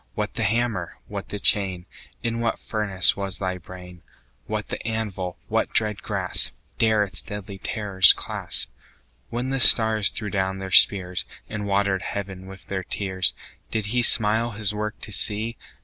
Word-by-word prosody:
What 105 0 -3
the 115 - -3
hammer? 110 -5 -1
what - - -7
the 105 - -5
chain? 95 -4 +2 0.4
In 115 -1 -2
what 115 -1 -1
furnace 100 -4 +3
was 95 -2 -3
thy 95 -1 -3
brain? 90 0 -12 0.5
What - - -4
the - - -5
anvil? 105 -5 -4
What - - 0
dread 105 -2 +1
grasp - - +1 0.2
15 - - -30
Dare 110 -1 +3
its 100 - -5
deadly 100 -1 -8
terrors 100 -5 +4
clasp? - - -2 0.6
When 125 +3 -3
the 135 - -1
stars 110 -4 +6
threw 105 -4 -6
down 95 -1 -1
their 95 -1 -7
spears, 90 -2 +5 0.2
And 105 -1 -5
water'd 100 -1 +1
heaven 95 -2 -6
with 95 0 -12
their 95 -1 -4
tears, 95 0 0 0.3
Did 110 -2 -2
He 125 - +2
smile 115 0 +2
His 105 0 -1
work 105 0 -4
to 110 - -7
see? 105 +5 +2
100 Hz, 165 wpm, -23 LUFS, 95-110 Hz, 0.6 s, stars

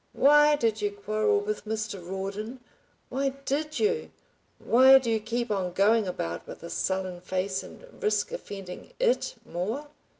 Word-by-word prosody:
"Why 295 +1 +6
did 225 -6 0
you 205 - +1
quarrel 215 - +1
with 425 - -4
Mr. 215 -3 -3
Rawdon? 195 +6 -5 0.5
Why 275 +1 0 0.2
DID 300 +2 -1
you? 450 +2 0 0.5
Why 260 +3 +7
do 250 -3 -1
you 220 - +2
keep 235 +2 -2
on 185 -3 -1
going 210 +3 +3
about 85 - -4
with - - -10
a 170 - -7
sullen 185 -2 -2
face 190 +1 -2
and - - -12 0.2
risk 455 +2 +1
offending 195 - -8
IT - - +1
more?" 220 - -4
220 Hz, 155 wpm, -27 LUFS, 190-290 Hz, 0.5 s, Why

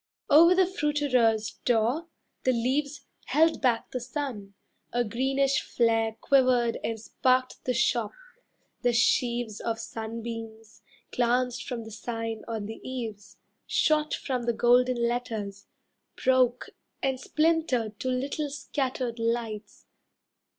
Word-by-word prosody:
Over 335 +5 +8
the 375 0 +5
fruiterer's 285 - +1
door, 245 +8 +1 0.4
the 255 - +3
leaves 275 +5 -1 0.2
Held 325 +2 +3
back 240 -4 +1
the 255 - -2
sun, 245 -6 -5 0.4
a 245 0 +1
greenish 265 +4 +1
flare 225 -1 +1
Quivered 255 -4 +3
and 225 -1 -2
sparked 255 +3 0
the 250 - +1
shop, 235 -2 +1 0.7
the 245 0 +2
sheaves 235 -2 +1
Of 230 -1 -2
sunbeams, 225 -1 -7 0.3
glanced 245 0 0
from 245 -3 -4
the 220 - -10
sign 225 0 -4
on 220 -3 -3
the 220 +2 -8
eaves, 225 -6 -6 0.3
Shot 305 0 +2
from 250 -3 -3
the 235 - +2
golden 245 +1 +3
letters, 220 -5 -4 0.5
broke 255 -1 +2 0.3
And 265 -1 0
splintered 305 -10 0
to - - -4
little 275 +4 -2
scattered 265 -4 -3
lights. 230 -2 -3
245 Hz, 120 wpm, -27 LUFS, 225-265 Hz, 0.7 s, Over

